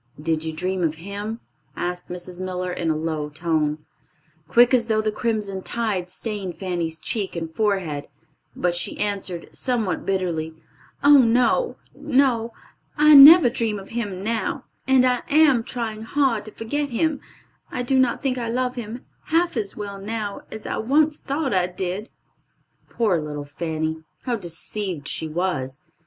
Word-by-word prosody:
"Did 160 Hz, 0 st, -1 dB
you 160 Hz, -, -3 dB
dream 180 Hz, +4 st, -2 dB
of 160 Hz, -1 st, +1 dB
him?" 205 Hz, +6 st, -6 dB, 0.3 s
asked 180 Hz, 0 st, -4 dB
Mrs. 180 Hz, 0 st, -6 dB
Miller, 180 Hz, -1 st, -3 dB
in 170 Hz, -2 st, -2 dB
a 160 Hz, -, +2 dB
low 155 Hz, -1 st, -2 dB
tone. 155 Hz, -1 st, -1 dB, 0.6 s
Quick 240 Hz, +8 st, +5 dB
as 235 Hz, -3 st, +3 dB
thought 215 Hz, -1 st, +1 dB
the 215 Hz, -, +1 dB
crimson 210 Hz, -4 st, -2 dB
tide 205 Hz, -5 st, -2 dB
stained 195 Hz, -2 st, -4 dB
Fanny's 175 Hz, -4 st, -3 dB
cheek 200 Hz, +3 st, -1 dB
and 165 Hz, -1 st, -5 dB
forehead, 185 Hz, -8 st, -1 dB, 0.5 s
but 175 Hz, -1 st, 0 dB
she 175 Hz, -, -2 dB
answered, 195 Hz, -4 st, -3 dB
somewhat 235 Hz, -7 st, -1 dB
bitterly, 170 Hz, -5 st, -2 dB, 0.5 s
"Oh, 285 Hz, 0 st, +8 dB
no, 250 Hz, -, +3 dB, 0.2 s
no! 265 Hz, -5 st, +1 dB, 0.5 s
I 305 Hz, 0 st, +7 dB
never 295 Hz, +2 st, +11 dB
dream 230 Hz, -3 st, -1 dB
of 195 Hz, -1 st, -10 dB
him 205 Hz, -5 st, -4 dB
now, 225 Hz, +1 st, -2 dB, 0.2 s
and 265 Hz, -1 st, +5 dB
I 250 Hz, -1 st, +2 dB
am 290 Hz, -5 st, +5 dB
trying 225 Hz, -3 st, -4 dB
hard 230 Hz, -2 st, 0 dB
to 215 Hz, -, -8 dB
forget 285 Hz, +8 st, -3 dB
him. 285 Hz, +4 st, 0 dB, 0.5 s
I 250 Hz, -, -3 dB
do 265 Hz, +2 st, +1 dB
not 255 Hz, 0 st, +1 dB
think 255 Hz, -2 st, 0 dB
I 230 Hz, -1 st, -3 dB
love 250 Hz, +1 st, 0 dB
him 240 Hz, 0 st, -7 dB, 0.2 s
half 335 Hz, +1 st, +1 dB
as 210 Hz, -4 st, -1 dB
well 200 Hz, -2 st, -6 dB
now 210 Hz, -1 st, -4 dB
as 220 Hz, -, -8 dB
I -, -, -2 dB
once 295 Hz, +6 st, +2 dB
thought 275 Hz, -2 st, -2 dB
I 180 Hz, -1 st, +2 dB
did." 185 Hz, +3 st, -4 dB, 0.8 s
Poor 210 Hz, -8 st, +1 dB
little 150 Hz, -1 st, -5 dB
Fanny! 160 Hz, +1 st, -3 dB, 0.2 s
How 245 Hz, -2 st, -1 dB
deceived 175 Hz, -3 st, -3 dB
she 160 Hz, -, -2 dB
was! 155 Hz, -5 st, -2 dB
205 Hz, 160 wpm, -23 LUFS, 175-245 Hz, 0.8 s, never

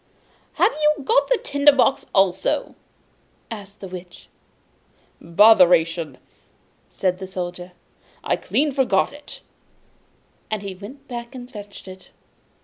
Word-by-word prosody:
'Have -, -, +3 dB
you 300 Hz, -1 st, +2 dB
got 460 Hz, -, +3 dB
the -, -, +2 dB
tinder 285 Hz, -4 st, +4 dB
box 270 Hz, -1 st, +1 dB
also?' 190 Hz, -, +1 dB, 0.8 s
asked 205 Hz, -2 st, -9 dB
the 195 Hz, -, -6 dB
Witch. 180 Hz, -1 st, -11 dB, 0.9 s
'Botheration!' 170 Hz, -, +4 dB, 0.7 s
said 185 Hz, -1 st, -1 dB
the 190 Hz, -, -6 dB
Soldier, 180 Hz, -1 st, -6 dB, 0.5 s
'I -, -, -8 dB
had -, -, +1 dB
clean 295 Hz, +1 st, 0 dB
forgotten 265 Hz, +1 st, +1 dB
it!' 295 Hz, -, -12 dB, 1.1 s
And 215 Hz, -2 st, -3 dB
then 200 Hz, -, -5 dB
he -, -, -6 dB
went 250 Hz, +10 st, -12 dB
back 240 Hz, 0 st, -7 dB
and 250 Hz, 0 st, -9 dB
fetched 205 Hz, -3 st, -11 dB
it. 185 Hz, 0 st, -12 dB
200 Hz, 130 wpm, -22 LUFS, 185-265 Hz, 1.1 s, tinder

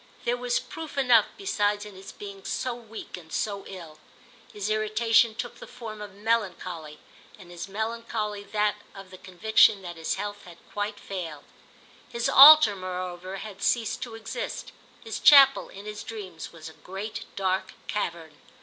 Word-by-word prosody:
There 240 Hz, +1 st, +2 dB
was 245 Hz, 0 st, 0 dB
proof 320 Hz, -3 st, -9 dB
enough 250 Hz, -3 st, +5 dB
besides 210 Hz, -, 0 dB
in 210 Hz, -, -10 dB
his 190 Hz, +1 st, -11 dB
being 200 Hz, -1 st, -10 dB
so 255 Hz, +4 st, -2 dB
weak 225 Hz, -4 st, -9 dB
and 160 Hz, -3 st, -14 dB
so 200 Hz, +1 st, -3 dB
ill. 165 Hz, -5 st, -10 dB, 0.5 s
His 205 Hz, -1 st, -4 dB
irritation 220 Hz, +1 st, +3 dB
took 240 Hz, +1 st, -6 dB
the -, -, -10 dB
form 215 Hz, -3 st, -9 dB
of 205 Hz, -2 st, -9 dB
melancholy, 185 Hz, -8 st, -2 dB, 0.4 s
and 180 Hz, -4 st, -14 dB
his 175 Hz, +2 st, -7 dB
melancholy 220 Hz, 0 st, -3 dB
that 210 Hz, 0 st, 0 dB, 0.2 s
of 195 Hz, -1 st, -11 dB
the 185 Hz, -, -12 dB
conviction 190 Hz, +2 st, +3 dB
that 175 Hz, -2 st, -7 dB
his 160 Hz, -, -2 dB
health 205 Hz, +1 st, -5 dB
had 175 Hz, -2 st, -13 dB
quite 205 Hz, 0 st, -3 dB
failed. 165 Hz, -7 st, -6 dB, 0.7 s
His 235 Hz, -1 st, -1 dB
altar 285 Hz, -6 st, +9 dB
moreover 185 Hz, 0 st, -5 dB
had 195 Hz, 0 st, -8 dB
ceased 230 Hz, -3 st, 0 dB
to 230 Hz, -2 st, -6 dB
exist; -, -, -6 dB, 0.3 s
his -, -, -5 dB
chapel, 275 Hz, -2 st, +7 dB
in 200 Hz, +1 st, -11 dB
his 210 Hz, 0 st, -6 dB
dreams, 190 Hz, -7 st, -8 dB
was 160 Hz, -1 st, -10 dB
a 160 Hz, -, -10 dB
great 195 Hz, +6 st, -7 dB
dark 190 Hz, 0 st, -1 dB
cavern. 165 Hz, -7 st, -4 dB
205 Hz, 160 wpm, -27 LUFS, 185-225 Hz, 0.7 s, altar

